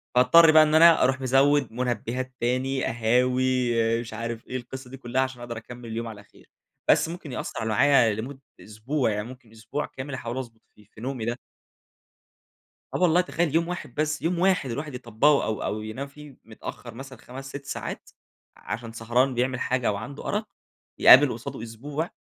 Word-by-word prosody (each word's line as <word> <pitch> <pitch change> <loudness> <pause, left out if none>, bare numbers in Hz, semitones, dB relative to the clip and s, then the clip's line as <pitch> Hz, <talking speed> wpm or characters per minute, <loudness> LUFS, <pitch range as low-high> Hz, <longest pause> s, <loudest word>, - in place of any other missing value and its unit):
فاضطر 155 +7 +7
بقى 155 0 +8
إن 155 0 +1
أنا 165 +1 +7
أروح 130 +1 +1
مزوِّد 135 +1 +3
مُنبهات 125 +1 -3
تاني 130 +2 0
قهاوي 125 +2 +1 0.3
مش 115 -2 -9
عارف 115 0 -5
إيه 130 - -3
القصة 130 +1 -9
دي 135 - -9
كلها 125 0 -1
عشان 130 -2 -3
أقدر 120 -1 -6
أكمل 120 +1 -10
اليوم 115 +1 -4
على 105 -2 -9
خير. - - -23 0.4
بس - - +4
ممكن 170 -4 -8
يأثر 115 -2 -4
معايا 115 +1 +4
لمدة 130 +6 -6 0.2
أسبوع، 115 +6 -2
يعني 105 +1 -3
ممكن 125 -3 -13
أسبوع 115 +6 -5
كامل 135 +2 -8
أحاول 120 -1 -5
أضبط 115 -4 -7
في 105 - -20
في 110 +1 -16
نومي 125 -2 -4
ده. 120 +1 -2 1.6
آه - - 0
والله، 175 0 +5
تخيل 170 -3 -1
يوم 165 +1 +2
واحد 175 -8 -6
بس، 155 0 -1
يوم 170 +2 0
واحد، 180 -7 +2
الواحد 140 +4 -5
يطبقه 125 +4 +2
أو 110 -2 -3
أو 105 +1 -3
ينام 110 +6 -5
فيه 145 -1 -14
متأخر 115 +1 -9
مثلًا 135 +2 -10
5، 135 +2 -10
6 140 +1 -8
ساعات، - - -6 0.5
عشان 115 +1 -6
سهران 120 +4 +1
بيعمل 125 +1 -1
حاجة 125 -2 0
أوعنده 120 +7 -5
أرق، 210 +1 -2 0.5
يقابل 135 +1 +8
قصاده 115 -1 -7
أسبوع، 140 +8 -5
130 Hz, 175 wpm, -25 LUFS, 115-140 Hz, 1.6 s, بقى